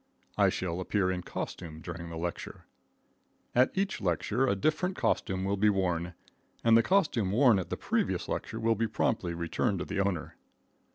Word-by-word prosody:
I - - +4
shall 90 -1 -2
appear 95 0 +1
in 90 -1 -2
costume 80 -2 -6
during 85 +1 -7
the 85 - -6
lecture. 85 +1 -5 0.9
At 125 +1 +5
each 195 - -1
lecture 105 +7 +1
a 100 - +2
different 155 - 0
costume 95 0 0
will 100 +1 0
be 105 +2 +4
worn, 90 -3 0 0.5
and 115 -1 +6
the 115 - +7
costume 125 - +2
worn 120 -2 +5
at 90 - -5
the - - -3
previous - - -1
lecture - - -4
will 115 0 +3
be 115 +1 0
promptly 95 -5 -1
returned 85 +4 -1
to 90 - -3
the - - -3
owner. 95 -4 -1
95 Hz, 175 wpm, -30 LUFS, 85-115 Hz, 0.9 s, the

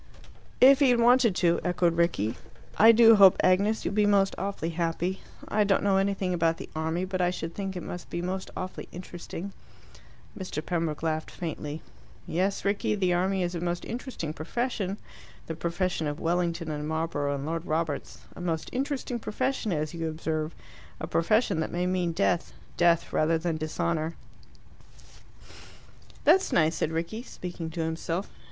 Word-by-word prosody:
"If 270 +2 +8
he 280 -3 +5
had 245 -1 +4
wanted 240 -3 +5
to," 170 -2 +3
echoed 175 -1 +1
Rickie. 165 - +1 0.4
"I 225 +2 +8
do 225 -1 +7
hope, 195 -2 +8
Agnes, 200 +4 +3
you'll - - -1
be 210 0 +3
most 195 -1 +3
awfully 195 -4 -3
happy. 170 +3 -2 0.3
I 210 0 +2
don't 200 -1 +2
know 195 -1 +3
anything 195 -1 0
about 165 -1 +1
the - - -8
army, 160 +3 -1
but 185 -1 -2
I 175 - +3
should 165 -2 -4
think 195 -2 -4
it 180 - -5
must 175 - -7
be 170 - -3
most 185 +2 -3
awfully 185 0 -6
interesting." 180 +2 -7 0.8
Mr. 170 -5 -5
Pembroke 165 -3 -2
laughed 155 -1 -1
faintly. 155 -2 -5 0.4
"Yes, 190 +4 -1
Rickie. 200 +1 +1
The 185 -3 +1
army 185 +1 +1
is 175 0 -2
a 170 - -3
most 175 0 -2
interesting 235 - -5
profession, 200 +3 -2 0.5
the 165 - -4
profession 170 0 -1
of 145 +1 -4
Wellington 170 -1 -1
and 150 0 -4
Marlborough 155 -3 -1
and 140 0 -5
Lord 165 +2 -3
Roberts; 155 -2 -2
a - - -8
most 165 -3 -2
interesting 265 -2 -2
profession, 255 0 -2
as 155 -1 -2
you 165 -1 -2
observe. 155 0 -3 0.4
A - - -3
profession 200 +1 +2
that 160 - -2
may 175 +1 -1
mean 180 -2 0
death 170 +1 0 0.2
death, 170 -1 +3
rather 160 +1 +3
than 165 0 -2
dishonour." 160 +1 -2 2.1
"That's 365 +6 +4
nice," 160 -1 +3
said 155 - 0
Rickie, 170 +8 -3
speaking 175 -8 -7
to 165 +1 -4
himself. 165 +3 -3
175 Hz, 165 wpm, -28 LUFS, 165-195 Hz, 2.1 s, If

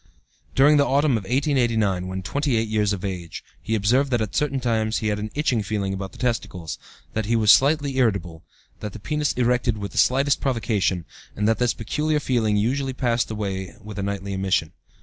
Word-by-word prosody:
"During 145 +3 +6
the 140 - +5
autumn 140 +2 +3
of 110 -5 0
1889 115 - +1
(when 95 0 -5
28 125 -3 0
years 105 -1 +1
of 100 -2 -3
age) 90 -4 -5 0.2
he 110 - -1
observed 125 +7 +2
that 120 -2 +1
at 110 -3 -3
certain 140 -2 0
times 110 -3 0
he 110 - -1
had 105 0 -1
an 105 +1 -4
itching 135 -6 +1
feeling 100 -1 -2
about 95 -1 -5
the - - -15
testicles; 95 -9 -3 0.3
that 110 -1 -2
he 115 - +2
felt 110 -2 +2
slightly 140 +2 +4
irritable; 95 -9 0 0.4
that 105 -2 -6
the - - -8
penis 150 +5 -1
erected 125 -2 +1
with 100 -1 -5
the - - -1
slightest 135 +2 +3
provocation, 105 -8 0 0.3
and 105 +1 0
that 115 - +2
this 125 -1 +1
peculiar 150 +7 -1
feeling 115 -7 +1
usually 130 +5 0
passed 120 -3 0
away 100 -1 -4
with 105 -1 -8
a - - -1
nightly 100 0 -3
emission. 95 -4 0
110 Hz, 195 wpm, -23 LUFS, 100-130 Hz, 0.4 s, During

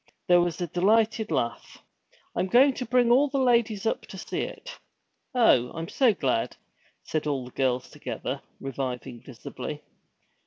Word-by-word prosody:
There 175 0 +6
was 175 -1 -1
a 175 - -1
delighted 215 +5 +2
laugh. 115 - -2 0.6
'I'm 185 - 0
going 260 +7 +5
to 250 0 -5
bring 245 0 +3
all 270 +4 +5
the 275 - -2
ladies 235 -5 +2
up 225 - 0
to - - -9
see - - -4
it.' - - -7 0.6
'Oh, 125 - +4
I'm 165 0 -5
so 260 -4 +4
glad!' 130 - -1 0.5
said 155 -1 -2
all 135 -4 -1
the 125 - -11
girls 130 -1 0
together, - - -5 0.2
reviving 130 -3 -5
visibly. - - -8
185 Hz, 155 wpm, -27 LUFS, -, 0.6 s, There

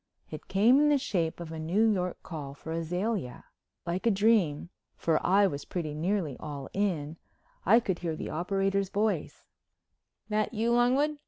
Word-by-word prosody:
It - - -8
came 230 +8 +5
in 295 0 +4
the 295 - +4
shape 180 - -1
of 170 -2 -7
a 160 - -6
New 180 +8 +2
York 180 -4 -1
call 145 -5 -7
for 160 - -8
Azalea. 170 - -3 0.4
Like 180 +6 -2
a - - +6
dream, 200 -7 +2 0.3
for 160 -2 0
I 200 +2 +4
was 145 -7 -2
pretty 160 -5 -4
nearly 165 -2 -1
all 145 -3 -7
in, 165 -6 -1 0.5
I 225 +5 +7
could 190 -7 -2
hear 165 -3 -2
the - - -5
operator's 195 +3 0
voice: 210 +2 -1 0.8
"That 215 +2 -1
you, 230 +2 +1
Longwood? 265 +5 +2
190 Hz, 165 wpm, -29 LUFS, 160-215 Hz, 0.8 s, I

